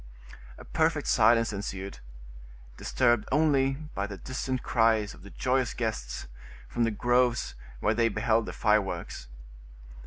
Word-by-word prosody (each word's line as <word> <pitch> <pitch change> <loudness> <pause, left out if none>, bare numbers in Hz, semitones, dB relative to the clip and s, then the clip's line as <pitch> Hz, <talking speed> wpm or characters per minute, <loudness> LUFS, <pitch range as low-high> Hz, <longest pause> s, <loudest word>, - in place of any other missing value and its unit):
A - - -12
perfect - - +1
silence 115 -2 +4
ensued, 100 -1 -5 0.8
disturbed 120 - +1
only 140 -2 +3 0.2
by 100 +1 -2
the 100 -1 -7
distant 130 +2 -3
cries 110 -3 +2
of - - -15
the 100 - -12
joyous 130 +3 0
guests, 65 - -3 0.4
from 120 -1 0
the - - +1
groves 120 +2 +1 0.3
whence 105 +1 +1
they 115 -1 +3
beheld 110 +1 +1
the - - -4
fireworks. 105 - 0
115 Hz, 130 wpm, -28 LUFS, 105-125 Hz, 0.8 s, silence